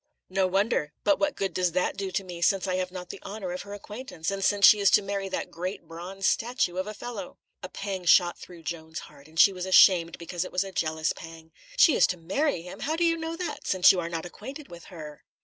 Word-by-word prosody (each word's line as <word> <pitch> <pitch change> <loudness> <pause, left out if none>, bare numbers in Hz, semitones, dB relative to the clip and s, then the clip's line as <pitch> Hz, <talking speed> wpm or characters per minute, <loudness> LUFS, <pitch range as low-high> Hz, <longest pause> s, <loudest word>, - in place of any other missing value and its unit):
"No 190 0 +2
wonder. 190 -5 0
But 300 - +3
what 295 -1 0
good 195 -3 -2
does 180 0 0
that 180 0 0
do 195 -1 -3
to 185 +1 -2
me, 175 -2 -8
since 195 +2 +2
I 185 -1 -1
have 185 -1 -2
not 180 -1 -7
the - - -11
honour 200 -3 -6
of 180 - -4
her 200 0 -8
acquaintance, 205 - -6
and 195 0 -3
since 200 +1 +4
she 210 - +8
is 200 - +5
to - - +5
marry 195 0 -3
that - - -4
great, 180 0 -5
bronze 180 +4 -6
statue 235 -6 +1
of 185 +2 -2
a 215 - -6
fellow?" 215 -4 -7 0.2
A 185 - -7
pang 195 -3 -5
shot 175 0 +5
through 170 -2 -12
Joan's 160 0 -6
heart, 145 -2 -15
and 160 +1 -7
she 200 - +7
was 180 0 -5
ashamed 180 -3 +5
because 170 +1 -4
it - - -8
was 185 - +1
a 195 - -8
jealous 160 -3 -1
pang. 165 0 -12 0.3
"She 325 - +7
is 180 - +5
to 180 - -3
marry 185 - -1
him! 180 - -10
How 310 +2 -1
do 340 - 0
you 330 0 +3
know 325 0 -4
that, 305 -4 -5
since 185 -1 +6
you 185 - -1
are 170 -1 -3
not 165 -1 -4
acquainted 270 - -9
with 170 0 -11
her?" 155 -5 -10
185 Hz, 255 wpm, -27 LUFS, 170-205 Hz, 0.3 s, she